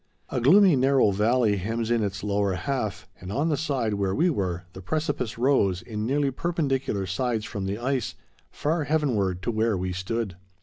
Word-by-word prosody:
A 125 - -2
gloomy, 180 - +6
narrow 130 -4 +4
valley 105 +1 +2
hems 115 +4 -2
in 120 -1 +2
its 100 0 -3
lower 100 -1 +1
half, 110 0 -3
and 90 +1 -7
on 145 +9 0
the 155 - +2
side 135 -7 -1
where 100 -1 0
we 175 +4 +3
were, 90 - -2
the 95 - -9
precipice 125 - -2
rose, 110 -8 +2
in 110 -1 -4
nearly 140 +1 +1
perpendicular 135 - -1
sides 110 +3 -1
from 95 -2 -4
the 100 +2 -2
ice, 130 0 -2 0.3
far 155 +1 -1
heavenward 110 - 0
to 120 - 0
where 110 -2 +1
we 90 0 -2
stood. 95 +1 -3
115 Hz, 180 wpm, -26 LUFS, 100-135 Hz, 0.3 s, gloomy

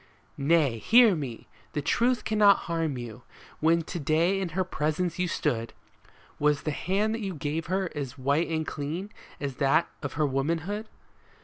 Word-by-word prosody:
Nay, 140 -5 +3
hear 230 - +6
me! 135 -7 -6 0.3
The 150 - -1
truth 240 - +2
cannot 210 -2 +5
harm 165 -5 -1
you. 120 -1 -7 0.4
When 165 +1 +3
to 175 +2 -5
day 165 +6 +2
in 185 - -2
her 185 - +3
presence 170 +1 -2
you 180 - +1
stood. 120 -8 -1 0.7
Was 150 -1 +2
the 155 - -1
hand 195 +8 0
that 230 - -3
you 195 -3 -3
gave 150 +2 -3
her 185 0 -1
as 140 -4 -5
white 140 +5 +1
and 160 -1 -1
clean 160 +8 -4 0.3
as 140 -3 -4
that 140 +4 +3
of 145 - -4
her 155 0 +1
womanhood 165 +10 -1
160 Hz, 170 wpm, -27 LUFS, 145-185 Hz, 0.7 s, hear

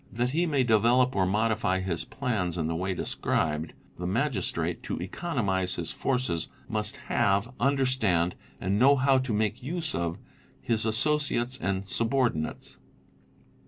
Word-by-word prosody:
That 120 +2 0
he 170 +5 +1
may 140 -4 +2
develop 125 +3 +4
or 95 -2 +2
modify 105 -2 +1
his 85 -3 -3
plans 105 -11 -2
in 80 - 0
the 80 +1 -1
way 95 +2 -1
described, 80 -2 -1 0.3
the 90 - -2
Magistrate, 120 +8 -1
to - - -4
economise 95 - -1
his 85 -2 -4
forces, 125 -12 -1 0.2
must 105 -3 -2
have, 105 +1 +1
understand, 130 -10 +2 0.3
and 100 +2 0
know 135 +3 +7
how 135 0 +4
to 130 -2 -3
make 110 0 0
use 160 +4 -3
of, 85 0 -2 0.4
his 115 -1 -1
associates 130 0 0
and 95 0 -1
subordi 115 +2 +1
nates. 80 - -5
110 Hz, 145 wpm, -28 LUFS, 95-130 Hz, 0.4 s, know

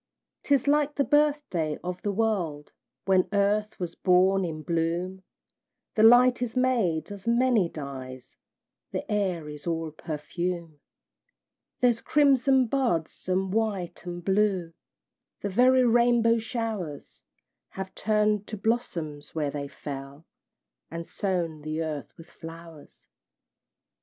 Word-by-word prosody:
'Tis 280 -2 +1
like 295 0 +2
the 280 - +2
birthday 290 - +1
of 180 0 -4
the 205 - -1
world, 190 -9 -1 0.3
When 190 -2 +3
earth 205 +1 +1
was 175 -2 -4
born 190 +1 +3
in 155 -3 -4
bloom; 170 +3 -1 0.7
The 215 - +1
light 245 +2 +7
is 245 -1 -2
made 210 -11 +1
of 200 +2 -9
many 235 -6 +3
dyes, 130 -4 -8 0.5
The - - -4
air 185 -7 0
is 150 +2 -9
all 165 -1 -2
perfume; 165 +1 -4 1.0
There's 240 -2 +3
crimson 270 -3 +4
buds, 225 - -1
and 185 +1 0
white 210 -5 -2
and 175 0 -7
blue 190 -4 +1 0.7
The 205 - -2
very 255 +5 +4
rainbow 235 -1 +4
showers 220 - -5 0.5
Have 190 0 -6
turn'd 210 -1 +1
to 215 - -5
blossoms 175 -11 -3
where 150 -3 -1
they 140 -1 -4
fell, 140 +2 -8 0.6
And 165 +1 -6
sown 175 -6 -2
the 155 +2 -3
earth 150 -3 -5
with 165 - -12
flowers. 165 -2 -12
190 Hz, 120 wpm, -27 LUFS, 165-230 Hz, 1.0 s, light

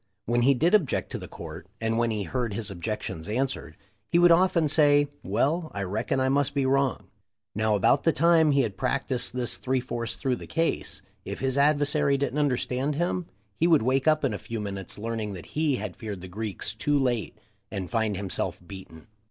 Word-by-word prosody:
When 120 +1 +1
he 135 +3 +5
did 165 - +2
object 185 -11 +2
to - - -3
the - - -8
court, - - -9
and 115 0 0
when 115 0 +2
he 105 -2 -1
heard 115 +2 -2
his 110 -3 -3
objections 95 -3 -4
an 105 - -2
swered, 85 - -6 0.4
he - - +3
would 175 0 +6
often 170 -2 +4
say, 145 -1 +4
'Well, 160 +3 0
I 100 - -2
reckon 110 +7 -1
I 130 - +2
must 140 +1 +1
be 140 -1 +1
wrong.' 135 -1 +1 0.5
Now, 110 0 +1
about 105 +7 +3
the 165 - +4
time 160 +1 +4
he 140 -1 +4
had 105 -6 -3
practised 130 0 -1
this 125 -2 0
three 130 0 0
fourths 120 -2 -4
through 130 -3 -1
the - - -10
case, 165 0 -1 0.2
if - - -5
his 130 -1 -1
adversary 145 0 +3
didn't 140 +1 -1
understand 135 0 0
him, 175 +2 -1 0.3
he 165 - +4
would 160 -8 +4
wake 130 +4 +1
up 155 -1 +4
in 135 - 0
a - - -4
few 115 -1 -5
minutes 100 -2 -5
learning 110 -1 -3
that 90 -4 -10
he 150 -3 +1
had 105 -5 -5
feared 105 -5 -6
the 95 - -8
Greeks 105 +1 -4
too 145 0 +1
late 125 -5 -1 0.3
and 95 -3 -4
find 110 -4 0
himself 95 -2 -3
beaten. 95 -5 -11
130 Hz, 205 wpm, -27 LUFS, 110-145 Hz, 0.5 s, would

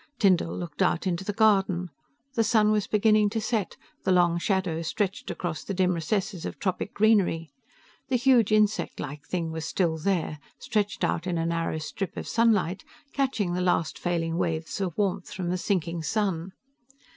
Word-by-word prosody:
Tyndall 185 -4 +2
looked 170 -4 -6
out 170 - +2
into 180 0 -1
the 205 - -2
garden: 195 -5 +2 0.4
the 230 - +2
sun 215 -1 +4
was 210 -2 +1
beginning 215 0 +4
to 225 - -2
set, 220 -3 -2 0.3
the - - +1
long 175 -2 +4
shadows 170 -4 -1
stretched 195 -1 -2
across 170 -3 -4
the 195 - -4
dim 185 0 +2
recesses 180 +2 -2
of - - -5
tropic 190 0 -2
greenery. 200 -7 +3 0.6
The 260 - +2
huge 245 -3 +4
insect 215 0 +2
like 145 0 -6
thing 170 -3 -2
was 160 -1 -4
still 160 -2 0
there, 165 -3 -1 0.2
stretched 210 -1 -1
out 170 +2 0
in 175 -2 -1
a 165 - 0
narrow 165 -1 -1
strip 160 +5 -5
of - - -5
sunlight, 215 -6 +2 0.3
catching 230 -10 0
the 180 - -1
last 175 -3 +1
failing 165 -1 -1
waves 165 +1 -2
of 180 -4 -2
warmth 200 -3 -1
from 180 -2 -3
the - - 0
sinking 170 -4 -1
sun. 185 +1 -1
185 Hz, 175 wpm, -27 LUFS, 165-210 Hz, 0.6 s, sun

